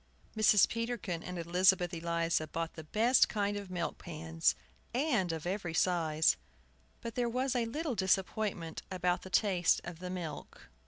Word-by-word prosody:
Mrs. 215 -2 +6
Peterkin 230 -7 -3
and 180 +1 -6
Elizabeth 180 +1 +3
Eliza 170 -1 0
bought 165 +1 -4
the 160 - -9
best 230 +9 +4
kind 205 -1 -1
of 200 -2 -6
milk 175 -2 -3
pans, 165 -1 0 0.4
of 190 - 0
every 180 -3 -3
size. 160 -3 +2 0.6
But 230 - -5
there 240 0 0
was 255 +2 -1
a 240 -2 +1
little 295 +4 -2
disappointment 190 -3 -1
about 180 -1 0
the 190 - -10
taste 185 -2 +3
of 170 -1 -8
the 180 0 -6
milk. 175 -5 -7
180 Hz, 150 wpm, -32 LUFS, 170-215 Hz, 0.6 s, Mrs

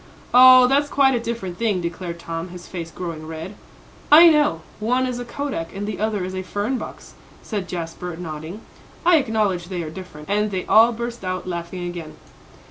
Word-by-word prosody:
"Oh, 255 0 +9
that's 280 +3 +2
quite 270 -2 +4
a 240 - +1
different 230 -7 -5
thing," 215 -5 +1
declared 170 0 -5
Tom, 165 +1 -5
his 180 0 -10
face 170 -3 -6
growing 165 -2 -6
red. 160 +4 -7 0.6
"I 330 +3 +10
know; 295 - +2 0.2
one 250 +4 +1
is 250 -1 -3
a 245 - -5
kodak, 240 - -5
and 200 +1 -4
the 210 -2 -5
other 210 -3 -1
is 185 - -6
a 185 - -3
fern 205 +7 -2
box," - - -9 0.3
said 205 -5 -4
Jasper, 170 0 -5
nodding. 165 +3 -7 0.4
"I 350 -1 +6
acknowledge 215 - 0
they 175 -1 -4
are 155 - -6
different," 160 -4 -10
and 210 +2 +1
they 185 -2 -3
all 225 +2 +6
burst 235 -1 -5
out 185 0 -3
laughing 175 0 -5
again. 170 -3 -7
190 Hz, 190 wpm, -22 LUFS, 170-235 Hz, 0.6 s, I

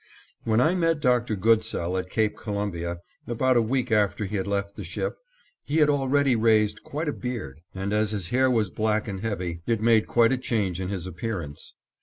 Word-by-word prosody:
When 110 0 +2
I 155 +8 +4
met 165 -3 +1
Dr. 125 -4 +2
Goodsell 95 -4 +1
at 90 0 -3
Cape 110 0 0
Columbia, 85 -5 -4 0.3
about 130 +2 +1
a 120 - +5
week 125 +2 -1
after 105 0 +2
he 100 +2 -4
had 95 -1 -2
left 100 0 -2
the - - -6
ship, 485 - -3 0.5
he 150 - -1
had 150 -2 +5
already 140 -1 +2
raised 110 -2 +2
quite 155 +3 -4
a 150 - 0
beard, 110 - -5
and, 95 +2 -2
as 105 0 +2
his 100 -5 -3
hair 130 +1 +3
was 110 -6 +1
black 110 0 0
and 100 -2 -4
heavy, 90 -6 -3
it 115 -2 +1
made 110 -1 +3
quite 115 -1 +4
a 130 - +1
change 100 -8 -1
in 90 - -3
his 95 -3 -4
appearance. 90 -5 -6
110 Hz, 200 wpm, -26 LUFS, 95-125 Hz, 0.5 s, a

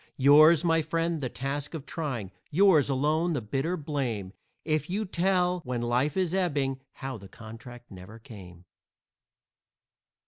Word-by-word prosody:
Yours, 155 +4 +6
my 165 -1 +3
friend, 165 +1 -2
the 130 - -2
task 140 +5 -4
of 150 -3 -7
trying; 130 - -4 0.2
yours 165 -4 +4
alone 155 +5 +1
the 145 - -1
bitter 135 +11 -2
blame, 130 - -3 0.3
If 155 0 -1
you 205 +4 -1
tell, 180 -1 +1
when 125 -6 -4
life 125 +7 0
is 185 -2 0
ebbing, 145 -8 0 0.3
how 135 -2 -4
the 100 -1 -13
contract 115 +3 -12
never 95 +3 -11
came. 90 -6 -13
145 Hz, 140 wpm, -27 LUFS, 120-165 Hz, 0.3 s, Yours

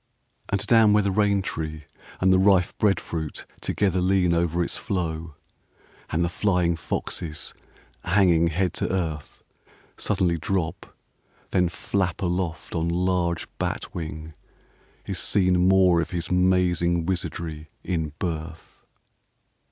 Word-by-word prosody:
VI - - -46
And 100 - +1
down 115 -3 +5
where 105 0 +4
the 100 - +1
rain 100 0 +2
tree 80 -3 -4 0.4
and 95 0 +4
the 95 - +4
rife 95 -2 +3
breadfruit 85 -6 -1 0.2
together 95 -3 0
lean 90 -1 +3
Over 85 0 +1
its - - -3
flow, 80 -4 -3 0.7
and 85 +2 +1
the - - 0
flying 90 -2 +1
foxes 80 -1 -4 0.5
hanging 85 -3 +4
head 90 +2 0
to - - -2
earth 80 -6 -3 0.5
Suddenly 85 -3 +1
drop 85 0 -3 0.6
then 90 -2 +2
flap 95 +1 -2
aloft 90 -3 -2
on 85 0 0
large 85 -1 0
bat - - -3
wing, 80 -1 -6 0.7
is - - -2
seen 90 -2 +3
More 95 -3 +5
of - - -4
his 85 -1 -4
mazing 90 -2 +2
wizardry 80 -3 -3
in 80 -4 -2
birth. 80 -2 -6
85 Hz, 130 wpm, -25 LUFS, 80-95 Hz, 0.7 s, down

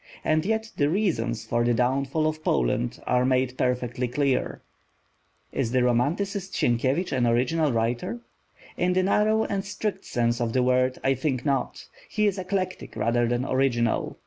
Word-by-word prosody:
And 155 +3 +1
yet 220 0 -1
the 145 0 +2
reasons 135 - -1
for 120 0 0
the 120 0 +2
downfall 135 +5 +1
of 155 0 -2
Poland 115 - 0
are 125 0 +2
made 130 0 +1
perfectly 125 -1 -1
clear. 135 +1 -1 0.9
Is 125 -4 -1
the 130 -1 +3
romanticist 180 - 0
Sienkiewicz 130 +9 +1
an 125 -3 +1
original 135 +6 +2
writer? 115 0 -1 0.6
In 180 +1 +1
the 185 0 +2
narrow 215 +3 +2
and 195 -2 -2
strict 205 -1 -4
sense 120 0 0
of 115 -1 -1
the 130 - +2
word, 130 0 +2
I 135 - +3
think 135 -1 -2
not. 135 -3 -1 0.2
He 210 -1 +1
is 200 -2 +1
eclectic 185 0 -3
rather 115 +2 +1
than 120 +2 0
original. 130 -4 0
130 Hz, 160 wpm, -25 LUFS, 120-175 Hz, 0.9 s, the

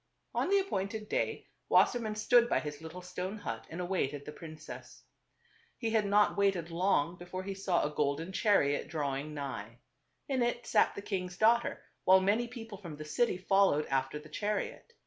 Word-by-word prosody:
On - - 0
the 400 - +5
appointed 215 - -2
day, - - -1 0.2
Wassermann 225 -3 +3
stood 240 +2 +4
by - - +3
his 150 0 -6
little 165 +3 -8
stone 180 +3 -4
hut - - -5
and 165 - -6
awaited 150 -6 -1
the - - -6
princess. 155 0 -10 0.7
He 230 -2 -2
had 220 -2 +2
not 205 +1 +4
waited 190 -4 +1
long 175 -2 +1
before 180 +1 -6
he 195 +1 -4
saw 190 -2 0
a 150 - -1
golden 150 +4 -1
chariot 185 -9 +2
drawing 150 -1 -3
nigh. 120 -6 -5 0.5
In 265 -2 0
it 240 0 0
sat - - +3
^ - - -20
the 200 - -6
king's 185 -3 -3
daughter, 235 +2 +3 0.2
while 190 +1 +7
many 210 +5 +2
people 225 -4 -9
from 170 -6 -8
the 155 +1 -8
city 230 +6 +1
followed 190 -5 +3
after 135 +2 0
the 150 +1 -11
chariot. 210 - -3
185 Hz, 180 wpm, -32 LUFS, 155-210 Hz, 0.7 s, while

